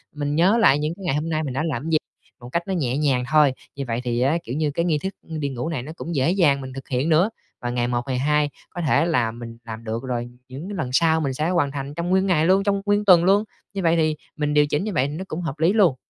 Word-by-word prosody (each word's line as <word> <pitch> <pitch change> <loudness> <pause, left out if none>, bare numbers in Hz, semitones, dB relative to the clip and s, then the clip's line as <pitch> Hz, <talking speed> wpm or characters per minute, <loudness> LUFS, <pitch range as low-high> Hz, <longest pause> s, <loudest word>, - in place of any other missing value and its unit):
mình 145 0 -2
nhớ 185 +8 +4
lại 145 -11 +5
những 150 +2 -1
cái 195 - -12
ngày 140 - +1
hôm 155 +2 -2
nay 155 -1 0
mình 135 -4 -4
đã 135 - -1
làm 160 -3 -2
cái 160 - -4
gì 155 - +5 0.4
một 120 - -9
cách 170 +6 -1
nó 195 - -1
nhẹ 135 -7 0
nhàng 135 -4 +1
thôi. 150 -3 +5 0.2
Như 140 - -3
vậy 115 +1 -2
thì 120 -1 -1
á, 140 +6 +3
kiểu 120 - -5
như, 150 -1 0
cái 170 +4 -1
nghi 160 -4 +2
thức 190 +1 -2
đi 155 -3 -4
ngủ 130 +2 -4
này 145 -7 -3
nó 150 - -8
cũng 170 0 -5
dễ 140 +4 +2
dàng 155 -8 +3
mình 130 -1 -7
thực 135 +1 -8
hiện 130 +4 0
nữa. 165 +6 +4 0.3
Và 120 - -2
ngày 120 0 0
một, 120 -1 0
ngày 130 -2 -1
hai 150 +2 +2 0.2
có 175 - -6
thể 160 0 +3
là 125 -10 +1
mình 115 0 -9
làm 110 0 -7
được 115 +2 -4
rồi, 120 -2 -3 0.2
những 140 +9 -7
cái 205 - -5
lần 125 - -2
sau 160 +2 +3
mình 140 -3 -1
sẽ 155 +5 -1
hoàn 165 -6 +1
thành 140 0 -5
trong 170 +3 -3
nguyên 190 +1 +3
ngày 165 -4 +3
luôn, 190 +3 +4
trong 200 -1 +1
nguyên 205 0 +2
tuần 180 -4 +7
luôn, 195 +3 +4 0.3
như 195 - -2
vậy 165 0 +4
thì 155 -2 +2 0.2
mình 150 -1 -1
điều 150 0 +5
chỉnh 145 +3 -1
như 210 -1 -3
vậy 135 -4 +2
nó 155 +6 -5
cũng 165 0 -4
hợp 155 -3 -4
lý 165 +5 +3
luôn. 195 -11 +4
150 Hz, 300 wpm, -23 LUFS, 130-170 Hz, 0.4 s, tuần